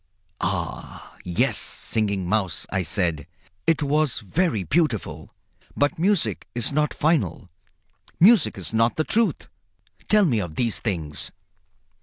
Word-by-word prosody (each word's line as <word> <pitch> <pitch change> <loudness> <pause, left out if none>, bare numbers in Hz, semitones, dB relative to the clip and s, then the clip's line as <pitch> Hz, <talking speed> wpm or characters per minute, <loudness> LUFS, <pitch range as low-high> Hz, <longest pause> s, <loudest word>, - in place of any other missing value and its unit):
"Ah! - - -4
yes, 90 -1 +1
Singing 100 -4 0
Mouse," 95 -5 0
I 95 - 0
said, 85 -3 -1 0.4
"it 165 -2 +2
was 145 -3 +1
very 115 - 0
beautiful. 145 - -1 0.5
But 145 +2 +1
music 195 +1 +1
is 120 +3 +1
not 150 0 +1
final. 145 - 0 0.7
Music 190 - +5
is 95 +3 -5
not 115 +1 +2
the 155 - 0
Truth. 225 +6 0 0.6
Tell 210 -1 +4
me 120 -10 +1
of 85 -6 -5
these 115 -3 0
things." 80 -9 -3
115 Hz, 125 wpm, -23 LUFS, 95-155 Hz, 0.7 s, Music